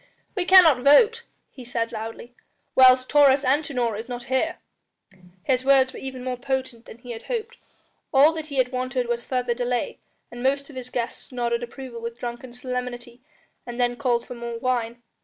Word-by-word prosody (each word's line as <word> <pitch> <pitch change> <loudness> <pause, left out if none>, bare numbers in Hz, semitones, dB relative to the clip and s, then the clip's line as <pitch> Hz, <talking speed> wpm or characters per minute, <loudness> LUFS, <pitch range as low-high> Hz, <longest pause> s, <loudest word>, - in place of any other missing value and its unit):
"We 370 -3 -1
cannot 350 -8 +7
vote," 440 - +5 0.3
he 255 - -11
said 230 -1 -3
loudly, 225 +2 -7 0.4
"whilst 255 0 +6
Taurus 285 -1 +5
Antinor 260 -5 0
is 225 +4 -7
not 245 -1 -5
here." 260 +7 -1 0.9
His 255 -1 +1
words 265 -1 +4
were - - -8
even 260 -1 -7
more 255 -1 -3
potent 260 -2 -3
than - - -12
he 245 +1 -10
had 225 -1 -7
hoped; 475 0 -4 0.5
all 285 +4 +6
that 315 -1 -5
he 285 - -7
had 255 -1 +1
wanted 255 -1 -2
was 235 0 -2
further 250 -2 -1
delay, 245 0 -2 0.3
and 240 - -8
most 280 +3 0
of - - -14
his 255 -1 -6
guests 245 +1 -4
nodded 235 -1 -1
approval 240 -1 -8
with 235 0 -6
drunken 240 +1 -6
solemnity 245 -1 -6 0.4
and 240 0 -8
then 245 0 +1
called 240 -2 0
for - - -8
more 235 -1 -6
wine. 240 -1 -2
250 Hz, 180 wpm, -24 LUFS, 240-270 Hz, 0.9 s, cannot